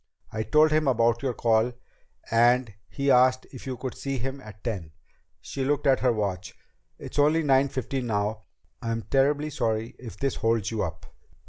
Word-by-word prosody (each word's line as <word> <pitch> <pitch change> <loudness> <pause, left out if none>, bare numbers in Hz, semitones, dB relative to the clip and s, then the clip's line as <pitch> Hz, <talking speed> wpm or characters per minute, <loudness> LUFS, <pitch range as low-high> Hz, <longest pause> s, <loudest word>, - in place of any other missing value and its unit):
I 110 - -3
told 155 +6 +4
him 155 -1 +2
about 120 -2 +2
your 130 -4 -1
call 115 +1 +2 0.6
and 120 0 +3 0.2
he 140 0 0
asked 130 0 +4
if 130 0 -10
you 130 -1 -3
could 125 0 -5
see 135 -1 -4
him 135 +3 -4
at 110 -3 -13
ten." 90 -9 -4 0.5
She 135 - -4
looked 145 +2 0
at 135 -2 +4
her 125 - +3
watch. 100 -5 -3 0.4
"It's - - -6
only 155 +3 +4
nine 135 -1 +3
fifteen 130 -1 -3
now. 105 0 -1 0.4
I'm 115 -1 -2
terribly 145 +4 +1
sorry 115 -3 -2
if 120 -3 -9
this 135 -1 -1
holds 115 -2 0
you 110 -2 -2
up." 85 - -4
125 Hz, 180 wpm, -26 LUFS, 110-135 Hz, 0.6 s, told